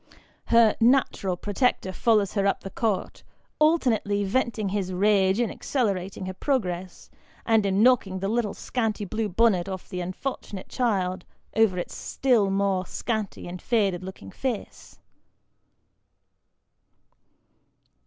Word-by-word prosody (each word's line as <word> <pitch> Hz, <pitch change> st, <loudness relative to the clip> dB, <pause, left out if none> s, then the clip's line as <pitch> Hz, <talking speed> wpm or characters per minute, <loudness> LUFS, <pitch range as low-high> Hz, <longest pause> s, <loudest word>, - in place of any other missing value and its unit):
Her 230 Hz, -2 st, +5 dB
" -, -, -36 dB, 0.2 s
natural 195 Hz, -8 st, -1 dB
pro 205 Hz, +3 st, -5 dB
tector" 195 Hz, -5 st, +1 dB
follows 210 Hz, -1 st, +2 dB
her 200 Hz, -2 st, +1 dB
up 195 Hz, -, 0 dB
the 195 Hz, -, -8 dB
court, 215 Hz, -5 st, -2 dB, 0.4 s
alternately 245 Hz, -10 st, +2 dB
venting 215 Hz, 0 st, 0 dB
his 190 Hz, -2 st, -2 dB
rage 195 Hz, +1 st, +3 dB
in 240 Hz, -, +1 dB
accelerating 195 Hz, -7 st, -2 dB
her 185 Hz, -, -4 dB
progress, 185 Hz, -7 st, -3 dB, 0.3 s
and 220 Hz, -3 st, +3 dB
in 195 Hz, +2 st, +2 dB
knocking 235 Hz, -7 st, +3 dB
the 195 Hz, +1 st, -2 dB
little 225 Hz, -1 st, -1 dB
scanty 220 Hz, -4 st, -2 dB
blue 215 Hz, +2 st, -2 dB
bonnet 195 Hz, -2 st, +2 dB
of 190 Hz, -1 st, -6 dB
the 180 Hz, -, -4 dB
unfortunate 185 Hz, +1 st, -5 dB
child 195 Hz, -7 st, 0 dB, 0.3 s
over 220 Hz, -4 st, +3 dB
its 175 Hz, -, -4 dB
still 240 Hz, -7 st, +1 dB
more 195 Hz, -2 st, 0 dB
scanty 220 Hz, -7 st, -3 dB
and 180 Hz, 0 st, -7 dB
faded 200 Hz, -6 st, +1 dB
looking 185 Hz, -, -9 dB
face. 250 Hz, -6 st, -5 dB
200 Hz, 130 wpm, -26 LUFS, 185-230 Hz, 0.4 s, Her